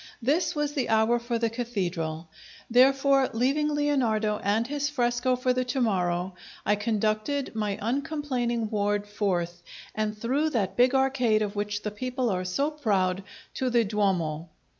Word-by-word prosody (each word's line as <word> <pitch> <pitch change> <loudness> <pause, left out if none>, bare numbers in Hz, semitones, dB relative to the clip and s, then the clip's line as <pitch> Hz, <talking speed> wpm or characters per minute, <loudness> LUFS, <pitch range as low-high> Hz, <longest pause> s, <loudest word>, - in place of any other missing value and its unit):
This 305 +8 +1
was 295 -1 -1
the 270 -5 -1
hour 225 +2 +3
for 235 0 -2
the 230 -1 0
Cathedral; 175 -9 -3 0.4
therefore, 270 +2 +4
leaving 275 +6 +1
Leonardo 240 -8 +1
and 210 +3 +1
his 290 +2 -2
fresco 245 -1 +1
for 250 0 +1
the 255 0 0
to 255 +2 -2
morrow, 180 -5 0 0.3
I 210 - +3
conducted 215 +6 -1
my 210 -2 -2
uncomplaining 245 -2 -1
ward 205 -1 0
forth, 180 -4 -2 0.3
and 215 0 -2
through 270 +8 0
that 195 -3 -1
big 250 +2 +4
arcade 255 -5 +2
of 205 0 -4
which 205 0 -2
the 210 - -2
people 250 +2 -2
are 185 -1 -2
so 275 +12 0
proud, 195 -10 0 0.3
to 260 - -1
the 240 -1 +3
Duomo. 180 -7 -1
230 Hz, 155 wpm, -27 LUFS, 205-260 Hz, 0.4 s, therefore